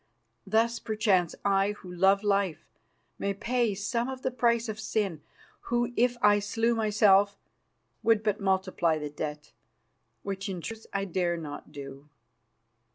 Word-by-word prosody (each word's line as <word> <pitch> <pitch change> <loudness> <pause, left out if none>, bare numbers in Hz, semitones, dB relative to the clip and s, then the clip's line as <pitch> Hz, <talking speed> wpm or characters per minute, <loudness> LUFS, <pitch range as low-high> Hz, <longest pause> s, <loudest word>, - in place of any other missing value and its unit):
"Thus, 230 +3 +2
perchance, 205 -5 +1
I, 200 +1 +3
who 185 -3 -11
love 195 +3 +3
life, 200 -4 0 0.5
may 200 0 -1
pay 235 0 0
some 235 +5 -1
of 260 -1 -7
the 260 - 0
price 235 -1 +1
of 215 -1 -5
sin, 200 -7 -1 0.5
who, 240 0 0
if 245 +1 +2
I 205 0 +6
slew 225 +3 0
myself, 205 -2 +4 0.6
would 225 -2 +3
but 210 0 0
multiply 190 -4 +1
the 150 -1 -5
debt, 150 0 -6 0.7
which 195 0 -4
in 185 -2 -4
truth 225 +5 -7
I 195 0 -1
dare 175 -2 0
not 155 -3 -8
do." 140 +1 -10
200 Hz, 145 wpm, -28 LUFS, 185-225 Hz, 0.7 s, I